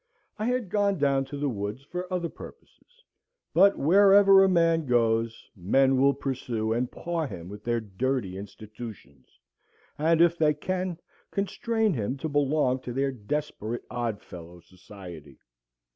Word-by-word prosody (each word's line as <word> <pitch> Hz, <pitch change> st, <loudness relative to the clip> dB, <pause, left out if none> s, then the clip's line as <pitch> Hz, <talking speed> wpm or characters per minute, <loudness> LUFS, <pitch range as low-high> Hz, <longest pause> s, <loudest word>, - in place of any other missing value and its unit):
I 215 Hz, -, -1 dB
had 245 Hz, -6 st, -1 dB
gone 200 Hz, -2 st, +1 dB
down 140 Hz, -2 st, +1 dB
to 145 Hz, +2 st, -7 dB
the 145 Hz, 0 st, -1 dB
woods 105 Hz, +1 st, -4 dB
for 180 Hz, +5 st, -6 dB
other 180 Hz, -2 st, -1 dB
purposes. 480 Hz, -, -15 dB, 0.5 s
But, 195 Hz, +4 st, +5 dB
wherever 195 Hz, +3 st, +6 dB
a 190 Hz, -, +4 dB
man 165 Hz, -3 st, +2 dB
goes, 115 Hz, -2 st, +1 dB
men 130 Hz, +8 st, +2 dB
will 140 Hz, 0 st, +4 dB
pursue 120 Hz, -5 st, -2 dB
and 120 Hz, +2 st, -1 dB
paw 170 Hz, -3 st, -3 dB
him 90 Hz, -6 st, -8 dB
with 105 Hz, +1 st, -10 dB
their 120 Hz, 0 st, 0 dB
dirty 110 Hz, -1 st, -2 dB
institutions, 105 Hz, -, -10 dB, 0.7 s
and, 160 Hz, +2 st, +3 dB
if 170 Hz, 0 st, +4 dB
they 150 Hz, -2 st, +3 dB
can, 185 Hz, +2 st, -3 dB, 0.3 s
constrain 220 Hz, +1 st, 0 dB
him 125 Hz, +1 st, -2 dB
to 145 Hz, -, -4 dB
belong 145 Hz, -3 st, +1 dB
to 125 Hz, -1 st, -7 dB
their 135 Hz, +2 st, 0 dB
desperate 120 Hz, -1 st, -4 dB
odd 120 Hz, -4 st, -3 dB
fellow 85 Hz, 0 st, -11 dB
society. 90 Hz, -5 st, -12 dB
135 Hz, 145 wpm, -27 LUFS, 110-170 Hz, 0.7 s, wherever